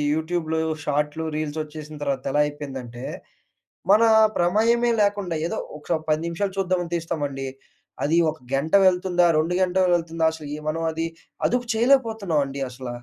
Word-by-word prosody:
యూట్యూబ్‌లు, 160 0 -1 0.2
షార్ట్‌లు, 150 +2 -1
రీల్సొచ్చేసిన 155 0 -5
తర్వాత 135 -2 -1
ఎలా 145 +2 +3
అయిపోయిందంటే, 135 -5 -7 0.9
మన 215 +3 +6 0.3
ప్రమేయమే 230 +7 +3
లేకుండా 200 -4 0
ఏదో 170 - -2 0.2
ఒక 160 +2 -1
10 155 +1 +2
నిమిషాలు 190 +3 -2
చూద్దామని 180 -2 -1
తీస్తామండి. 145 -5 -3 0.6
అది 160 +4 +2
ఒక 155 - -12 0.2
గంట 140 +4 -1
వెళ్తుందా? 180 -1 +2
2 165 +3 +1
గంటలు 185 0 +2
వెళ్తుందా? 165 -1 -1
అసలు 155 -2 -8 0.2
మనం 165 +1 -2
అది 165 +1 -2 0.4
అదుపు 245 0 0
చేయలేకపోతున్నామండి 220 - +1
అసల. 125 0 -8
160 Hz, 130 wpm, -24 LUFS, 150-185 Hz, 0.9 s, మన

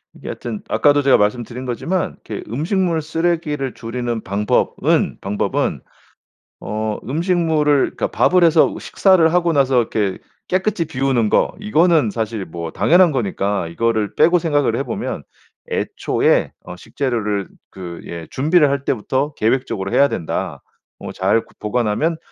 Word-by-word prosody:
이게 - - -10
하여튼 205 -2 -6
아까도 145 0 +3
제가 135 -1 +5
말씀드린 120 +4 -1
거지만 165 +9 -2
이렇게 - - -6
음식물 165 - 0
쓰레기를 155 -5 -1
줄이는 115 0 -4
방법은, 100 +2 0
방법은 100 +1 -1 0.8
어 110 0 -3
음식물을 160 - +1 0.2
그러니까 - - -1
밥을 180 -1 +3
해서 165 -1 +4
식사를 175 -4 +3
하고 175 -1 +2
나서 135 -3 +3
이렇게 105 -4 -1 0.3
깨끗이 185 -2 0
비우는 130 -6 0
거 - - +2
이거는 170 - +3
사실 110 -3 -3
뭐 85 0 -6
당연한 175 0 +4
거니까 100 -6 -1
이거를 110 +4 -1
빼고 170 +3 +4
생각을 145 -8 +1
해 135 - -1
보면 125 - -4 0.5
애초에 - - +1
어 90 - -8
식재료를 105 -2 -2 0.2
그 90 -3 -8
예 85 -2 -7
"준비를 150 +2 +3
할 140 -1 -2
때부터 135 +5 -1
계획적으로 110 -5 -1
해야 140 - +5
된다. 85 - -4 0.4
뭐 - - -7
잘 100 +4 +1
그 - - -23
보관하면 120 +9 0
130 Hz, 330 characters per minute, -19 LUFS, 105-160 Hz, 0.8 s, 제가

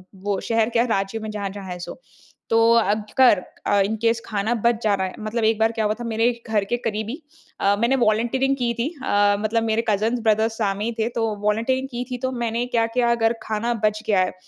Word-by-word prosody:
वो 195 +1 -2
शहर 225 -1 +2
क्या 235 0 +2
राज्य 200 -1 -1
में 215 0 -6
जहाँ 205 -2 -3
जहाँ 200 0 -8
है 180 - -5
सो। 175 - -8 0.5
तो 225 - +3 0.2
अगर 215 +1 +3 0.3
अ, 205 - +3
इन 220 +2 -1
केस 230 0 +2
खाना 215 +1 -1
बच 235 0 +1
जा 210 - +3
रहा 190 -1 0
है - - -8
मतलब 225 +2 -2
एक 220 0 +2
बार 225 +1 +3
क्या 220 -2 -1
हुआ 210 - +2
था - - -5
मेरे 230 +1 +1 0.2
घर 215 -2 +1
के 240 - -1
करीबी 225 +6 -4 0.4
अ, 200 +1 +3
मैंने 235 +4 +2
वॉलंटीरिंग 240 +4 +1
की 240 -2 0
थी। 245 +5 0
अ, 205 -3 +3
मतलब 220 +2 0
मेरे 225 +1 0
कजिन्स, 220 +4 +1
ब्रदर 220 -1 +2
सामने 210 -2 -2
ही 235 - -1
थे 220 - +1
तो 230 - +1 0.2
वॉलंटीरिंग 230 +6 0
की 245 0 -3
थी। 250 - -2
तो 260 +1 -2
मैंने 235 -1 -2
क्या 235 -2 +1
किया 235 0 +1
अगर 225 -1 +2
खाना 220 +2 -1
बच 215 0 0
गया 205 -3 +3
है 185 0 +1
225 Hz, 230 wpm, -22 LUFS, 210-235 Hz, 0.5 s, तो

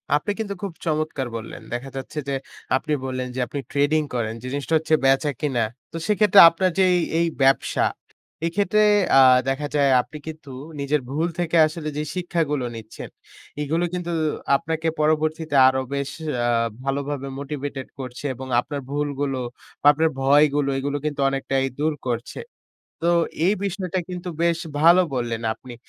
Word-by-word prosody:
আপনি 150 +7 0
কিন্তু 210 -2 -2
খুব 200 - -3
চমৎকার 155 -4 -1
বললেন। 115 0 -7
দেখা 125 +3 -4
যাচ্ছে 135 +3 -7
যে - - -1 0.4
আপনি 155 +3 -3
বললেন 130 -1 -3
যে - - -3
আপনি 140 - -5
ট্রেডিং 145 +3 +2
করেন, 110 -2 -1
যে 125 - -7
জিনিসটা 140 +2 -1
হচ্ছে 160 0 +2
বেচা-কিনা। 135 -2 +1 0.3
তো - - -5
সেক্ষেত্রে 210 -2 +5
আপনার 185 +3 0
যেই 185 -1 +5 0.2
এই 170 - +2
ব্যবসা, 135 0 +3 0.6
এই 165 - 0
ক্ষেত্রে 205 +1 +2 0.4
আ - - +9 0.3
দেখা 140 +2 -1
যায় 140 -2 +4
আপনি 150 +5 -11
কিন্তু 155 -2 -8 0.3
নিজের 140 +1 0
ভুল 155 +5 0
থেকে 170 -1 +1
আসলে 155 0 -5
যে 150 - -1
শিক্ষাগুলো 165 -7 -1
নিচ্ছেন, 110 -1 -9 0.5
এগুলো 160 +4 0
কিন্তু 175 -1 -3 0.4
আপনাকে 160 +3 -2
পরবর্তীতে 155 0 0
আরো 130 0 +2
বেশ 140 -1 -2 0.4
আ - - +2 0.3
ভালোভাবে 140 0 -2
মোটিভেটেড 140 -1 -5
করছে 130 +2 -7
এবং 130 +2 -8
আপনার 140 +3 -4
ভুলগুলো, 145 -2 -2 0.4
বা - - -11
আপনার 160 +2 +2
ভয়গুলো, 145 +1 +4
এগুলো 140 +1 -2
কিন্তু 145 -2 -3
অনেকটাই 135 0 -1
দূর 155 +1 +1 0.2
করছে। 120 0 -4 0.7
তো - - +4 0.3
এই 195 - +4
বিষয়টা 190 -2 -2
কিন্তু 180 0 -5
বেশ 170 -1 +2 0.2
ভালো 170 +3 +7
বললেন 120 -2 -2
আপনি। 125 +2 -12
145 Hz, 155 wpm, -23 LUFS, 135-160 Hz, 0.7 s, আ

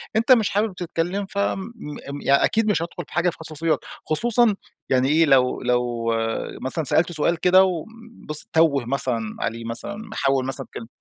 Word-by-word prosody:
أنت 230 +4 +2
مش 225 -5 +5
حابب 205 -1 0
تتكلم 175 +3 -2
فم 200 -1 -1 0.2
م 145 -7 -8
ي - - 0
أكيد 220 +9 +3
مش 165 - 0
هادخل 170 - -5
في - - -15
حاجة 175 +1 +2
في - - -8
خصوصيات؛ 160 0 -1 0.3
خصوصًا 230 +6 +3 0.3
يعني 130 0 +2
إيه 160 +2 +4
لو 130 -3 +3
لو 120 -2 0 0.5
مثلًا 145 +5 -2
سألته 165 +5 +1
سؤال 165 +2 +1
كده 185 +2 +6
و 180 -4 -1 0.4
بس 150 - -1
تَوّه 155 -6 +3
مثلًا 120 -4 -2
عليه 115 +1 -3
مثلًا 120 - -3
محول 135 -12 -1
مثلًا 135 - -2
كلم 115 - -7
160 Hz, 175 wpm, -23 LUFS, 130-190 Hz, 0.5 s, كده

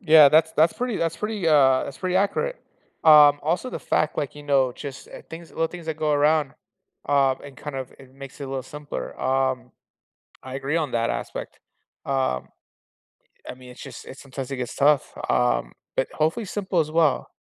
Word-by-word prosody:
Yeah, 155 -6 +8
that's 160 +2 +4
that's 160 +2 +4
pretty 245 -3 -3
that's 165 0 -1
pretty 210 -3 -3
uh, 135 -4 +5
that's 140 - -8
pretty 185 0 -1
accurate. 340 - 0 0.5
Um, 150 -2 +8
also 170 +11 -1
the - - -5
fact, 155 - 0
like, 145 - -3
you 145 - -10
know, 135 -3 +2
just, 135 +2 -9
eh, - - -9
things 165 0 -10
little 165 - 0
things 175 0 -10
that 160 - -3
go 155 -1 +1
around, 145 -1 +2 0.6
um, 135 -2 +3
and 140 -1 -10
kind 145 -2 -7
of 130 -2 -6
it 130 -1 -16
makes 135 +1 -11
it - - -4
a 135 - -7
little 135 -1 -3
simpler. 150 +2 -7
Um, 130 -1 0 0.7
I 130 0 -8
agree 135 +3 -2
on 155 -4 -1
that 115 0 +1
aspect. - - -5 0.5
Um, 130 - -1 1.0
I - - -4
mean, 125 0 -14
it's 125 - -13
just - - -10
it's 135 - -11
sometimes 135 -1 -7
it 135 - -3
gets 125 -1 -5
tough, 145 0 +3 0.2
um, 125 - +1 0.2
but - - +1
hopefully 160 +9 0
simple 190 -3 -2
as 155 -1 0
well. 160 -4 +2
145 Hz, 195 wpm, -24 LUFS, 135-160 Hz, 1.0 s, Yeah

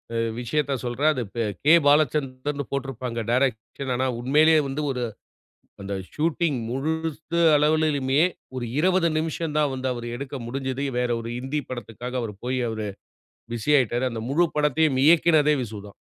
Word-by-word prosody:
அ - - 0 0.2
விஷயத்தச் 140 +1 -1
சொல்றேன். 125 +5 +1
அது 125 - -2
ப - - -8 0.3
கே. 155 - +6
பாலச்சந்தர்ன்னு 145 -1 +1
போட்டிருப்பாங்க 130 -3 -3
டிரெக்ஷன். 125 +1 -1
ஆனா, 130 - 0
உண்மையிலேயே 155 +5 +4
வந்து 135 +3 -3
ஒரு 125 - -3 0.8
அந்த 100 +1 -5 0.2
ஷூட்டிங் 160 -2 0
முழுசு 160 +4 -2 0.2
அளவிலுமே 150 -2 +2 0.4
ஒரு 120 -2 -3
20 180 +1 +3
நிமிஷம் 160 0 -3
தான் 150 -2 +2
வந்து 130 0 -2
அவர் 120 -1 -6
எடுக்க 140 +1 -7
முடிஞ்சது. 135 +2 -3 0.2
வேற 125 0 +1
ஒரு 115 - -6
ஹிந்தி 135 +4 -2
படத்துக்காக 120 0 -6
அவர் 105 -3 -5
போய் 130 +1 -1
அவரு 110 -1 -3 0.7
பிஸி 120 +5 -1
ஆயிட்டாரு. 120 0 0
அந்த 115 - -5
முழு 170 +5 +3
படத்தையும் 150 -1 +2
இயக்குனதே 155 -2 +5
விசு 110 -3 -6
தான். 100 - -14
135 Hz, 150 wpm, -24 LUFS, 125-150 Hz, 0.8 s, கே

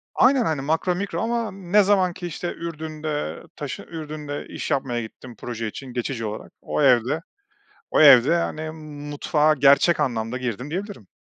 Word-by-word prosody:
Aynen, 255 -2 +4
hani, 150 -4 -1
makro 160 +5 0
mikro 180 -3 -3
ama 230 0 -1
ne 195 +2 +2
zaman 190 -3 +3
ki 175 -1 -6
işte 175 +2 -4
Ürdün'de 155 - -5
taşı - - -5
Ürdün'de 150 -3 -6
iş - - -5
yapmaya 125 -4 0
gittim 115 +2 -10
proje 115 0 -5
için 125 +3 -8
geçici 120 -1 -3
olarak, 105 0 -6
o - - -2
evde, 130 +3 +3 0.7
o - - +4
evde, 140 +2 +8
hani, 155 -1 -3 0.4
mutfağa 150 +1 +2
gerçek 140 +4 +4
anlamda 120 -3 -1
girdim, 125 +2 -4
diyebilirim. 195 - -5
150 Hz, 155 wpm, -23 LUFS, 125-175 Hz, 0.7 s, evde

